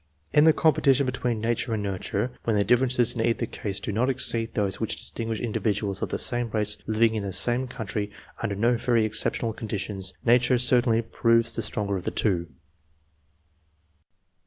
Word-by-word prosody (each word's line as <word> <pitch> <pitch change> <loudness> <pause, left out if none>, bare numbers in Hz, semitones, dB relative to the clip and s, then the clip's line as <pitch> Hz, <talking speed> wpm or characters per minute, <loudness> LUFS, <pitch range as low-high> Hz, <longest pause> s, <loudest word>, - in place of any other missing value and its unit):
In 150 - +5
the 160 - +7
compe 155 -2 +2
tition 135 0 +3
between 125 -3 -2
nature 115 +1 -1
and 105 - -3
nurture, 100 +4 -3
when 115 - 0
the 100 - +2
differences 125 +2 +3
in 115 - -3
either 115 +1 0
case 100 -3 -4
do - - -4
not 115 +6 0
exceed 115 -3 +1
those 100 -2 -1
which - - -2
distinguish 115 -1 -4
individuals 105 -3 -2
of - - -2
the - - -2
same 120 -1 +1
race 105 -1 +1
living 110 +1 +2
in 110 - -2
the 100 -1 -4
same 120 +6 +1
country 110 -4 -4 0.3
under 100 - -2
no 120 +4 +2
very 115 -1 +1
ex 110 0 0
ceptional 115 -2 -2
conditions, 100 -3 -3
nature 125 +1 +4
certainly 120 -1 +3
proves 115 0 +2
the 115 - -3
stronger 100 -2 -1
of 90 - -8
the - - 0
two. 85 -5 -1
115 Hz, 180 wpm, -25 LUFS, 105-120 Hz, 0.3 s, the